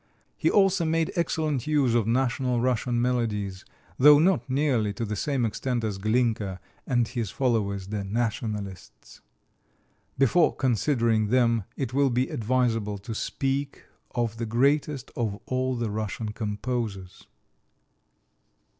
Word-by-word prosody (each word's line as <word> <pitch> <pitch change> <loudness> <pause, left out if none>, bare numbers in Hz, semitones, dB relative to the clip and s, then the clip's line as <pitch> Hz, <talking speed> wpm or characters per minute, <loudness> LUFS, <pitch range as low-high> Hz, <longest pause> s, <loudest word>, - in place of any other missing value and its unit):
He - - +1
also 195 -3 +3
made 165 0 +1
excellent 155 -6 -1
use 145 -6 +2
of 115 -3 +2
national 125 0 +1
Russian 120 -1 0
melodies, 110 -6 -1 0.3
though 145 +2 +8
not 155 -6 +2
nearly 130 -7 +1
to 115 +4 -3
the 105 0 -3
same 135 +1 0
extent 120 +2 -2
as 105 -3 -2
Glinka 110 -3 0 0.3
and 120 -3 +2
his 115 -4 -3
followers, 100 -7 -1
the 105 -1 -3
"nationalists." 105 -2 -4 1.0
Before 140 +6 +3
considering 115 -3 +1
them 115 -3 +2
it 130 -3 -3
will 140 0 +3
be 125 +1 0
advisable 115 -6 0
to 100 +3 -7
speak 135 +5 -2 0.3
of 115 -2 -1
the 115 0 -3
greatest 135 +3 +1
of 110 -4 -2
all 130 0 -1
the 115 -3 -2
Russian 110 +1 -3
composers. 105 -3 -4
120 Hz, 130 wpm, -26 LUFS, 110-135 Hz, 1.0 s, though